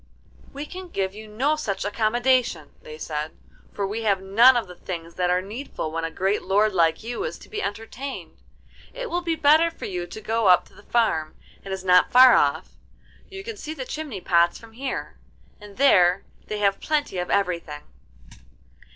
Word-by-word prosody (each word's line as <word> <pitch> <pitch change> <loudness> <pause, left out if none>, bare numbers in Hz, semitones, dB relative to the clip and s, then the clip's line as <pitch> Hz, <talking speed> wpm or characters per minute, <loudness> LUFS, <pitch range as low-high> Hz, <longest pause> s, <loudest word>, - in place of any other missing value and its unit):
'We 285 +2 -6
can 370 +4 -9
give 190 - -2
you 215 +1 -10
no 260 +9 0
such 200 -11 -3
accommodation,' 235 - +1
they 155 - -10
said, 155 0 -5 0.3
'for 200 - -3
we 210 +4 -3
have 200 -3 +1
none 230 +7 +5
of 235 - -1
the 180 - -10
things 170 -2 -7
that 180 0 0
are 180 +1 +1
needful 210 - -6
when 165 +1 -3
a 165 - -1
great 195 +5 -1
lord 205 +2 +2
like 165 -1 +2
you 240 +1 -4
is - - -4
to - - -16
be 425 0 -4
entertained. 240 - -6 0.5
It - - -5
will 350 - 0
be 335 -2 -1
better 315 +2 +4
for 330 - -9
you 180 -2 -4
to 220 - -9
go 220 0 0
up 180 -1 +5
to - - -24
the - - -16
farm. 160 -10 0 0.3
It 195 - -8
is 190 -1 -4
not 180 -1 +4
far 255 0 +8
off, 160 +2 +2 0.6
you 390 0 -8
can 450 0 -7
see 315 -4 -6
the 260 -4 -6
chimney 285 -9 -6
pots 170 -1 +3
from 225 -1 -15
here, 265 +3 -5 0.4
and 205 -1 -13
there 185 -9 +4 0.2
they 210 - -3
have 200 -1 +1
plenty 290 - -1
of 180 - -3
everything. 170 -6 -1
210 Hz, 195 wpm, -24 LUFS, 180-260 Hz, 0.6 s, far